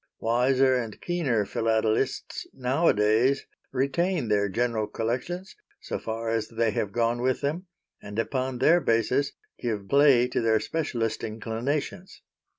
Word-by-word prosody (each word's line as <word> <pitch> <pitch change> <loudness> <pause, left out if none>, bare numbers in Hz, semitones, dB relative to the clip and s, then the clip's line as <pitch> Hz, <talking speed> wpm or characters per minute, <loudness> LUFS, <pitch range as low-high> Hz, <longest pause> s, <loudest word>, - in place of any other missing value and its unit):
Wiser 130 +3 +3
and 115 -4 -2
keener 140 -12 0
Philatelists 110 0 -1
nowadays 125 -2 +2 0.3
retain 140 +2 0
their 100 -1 +2
general 115 +1 0
collections, 125 - -3 0.2
so - - -4
far 115 0 -4
as 115 -1 -1
they 115 -1 0
have 100 0 -2
gone 120 +2 0
with 130 0 0
them, 160 +6 -2 0.3
and 105 +1 -8
upon 130 +2 -1
their 165 +7 +4
basis 125 +5 +1 0.3
give 105 -5 -3
play 140 -2 +5
to - - -1
their 110 -1 +3
specialist 120 -8 -2
inclinations. 120 - -4
120 Hz, 130 wpm, -26 LUFS, 110-140 Hz, 0.3 s, play